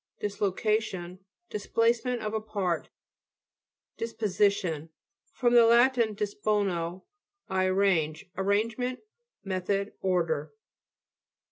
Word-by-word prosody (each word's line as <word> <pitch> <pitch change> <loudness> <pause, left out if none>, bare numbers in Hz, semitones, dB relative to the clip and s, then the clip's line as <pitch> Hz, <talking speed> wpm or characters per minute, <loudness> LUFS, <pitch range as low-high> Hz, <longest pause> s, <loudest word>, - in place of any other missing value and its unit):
DISLOCATION 200 -2 -1 0.3
Displacement 230 +3 0
of 215 0 -3
a 220 - -1
part. 200 -6 -2 1.1
DISPOSITION 200 -7 0 0.4
fr. 245 - +1
lat 240 +2 +6
dispono, 205 -6 -1 0.4
I 190 0 +1
arrange. 185 -5 +1
Arrangement, 220 +6 0 0.4
method, 195 +1 -1
order. 160 -5 0
200 Hz, 75 wpm, -28 LUFS, 185-220 Hz, 1.1 s, lat